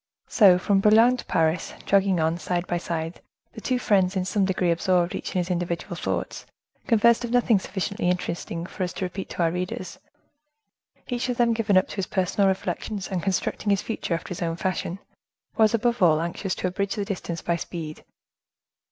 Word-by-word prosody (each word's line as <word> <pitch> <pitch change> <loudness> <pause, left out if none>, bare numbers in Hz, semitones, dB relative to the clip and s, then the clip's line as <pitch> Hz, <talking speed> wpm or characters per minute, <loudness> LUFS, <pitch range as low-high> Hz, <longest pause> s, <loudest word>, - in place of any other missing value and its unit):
So, 195 -5 +6
from 195 +2 +2
Boulogne 225 +5 +5
to - - -8
Paris, 160 +1 0
jogging 195 -2 +3
on, 160 +2 +1
side 175 0 -2
by 175 -1 -1
side, 165 -1 -4 0.3
the - - -9
two 255 - 0
friends, 195 -5 +2
in 185 -1 0
some 195 +1 +1
degree 185 -2 +1
absorbed 175 +1 +1
each - - -5
in - - +2
his 180 0 -1
individual 175 +1 -2
thoughts, - - -4 0.4
conversed 235 +1 +4
of 240 - -3
nothing 240 -3 +3
sufficiently 195 0 -2
interesting 175 -1 -3
for 190 - -9
us 180 - -3
to 190 - -3
repeat 185 +1 -6
to 175 - -1
our 165 - +2
readers. 180 +1 -5 1.1
Each 245 0 -2
of 245 - -1
them 235 -1 +3
given 210 -4 +2
up 185 - +3
to - - -8
his 195 - -1
personal 195 +1 +1
reflections, 190 +1 -2
and 185 -2 -2
constructing 195 +2 -1
his 200 -2 +2
future 215 -6 -2
after 165 - -6
his 180 - -6
own 165 -1 -1
fashion, 185 0 -2 0.6
was, 220 0 +4
above 235 0 0
all, 160 -4 +5
anxious 170 +3 -3
to - - -2
abridge 195 +2 -2
the 205 -2 -2
distance 180 -4 -4
by 170 - +1
speed. 160 -2 -6
185 Hz, 195 wpm, -25 LUFS, 175-205 Hz, 1.1 s, So